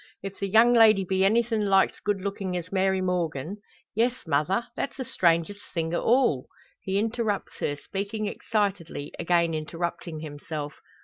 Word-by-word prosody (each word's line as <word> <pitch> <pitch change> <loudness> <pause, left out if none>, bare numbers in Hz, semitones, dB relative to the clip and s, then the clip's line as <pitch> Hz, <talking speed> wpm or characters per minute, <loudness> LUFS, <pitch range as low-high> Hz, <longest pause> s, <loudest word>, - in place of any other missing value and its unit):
If 195 0 -7
the 200 - -1
young 225 +4 +6
lady 215 -4 +6
be 190 +1 +1
anythin' 220 +1 +2
like's 195 -1 +3
good 205 -2 -1
lookin' 195 -2 -3
as 175 0 -4
Mary 190 0 +2
Morgan 175 -1 -2 0.2
" - - -29
"Yes, 240 +3 0
mother! 165 +9 +1
that's 275 - -3
the 260 - -4
strangest 170 +1 +1
thing 165 0 -1
o' - - 0
all 235 - +2 0.2
" - - -35
He 190 0 -1
interrupts 220 -1 -1
her, 145 - -1
speaking 200 +7 -4
excitedly; 200 -8 -2
again 170 -1 +2
interrupting 165 +1 -4
himself. 150 0 -6
190 Hz, 165 wpm, -26 LUFS, 165-210 Hz, 0.2 s, young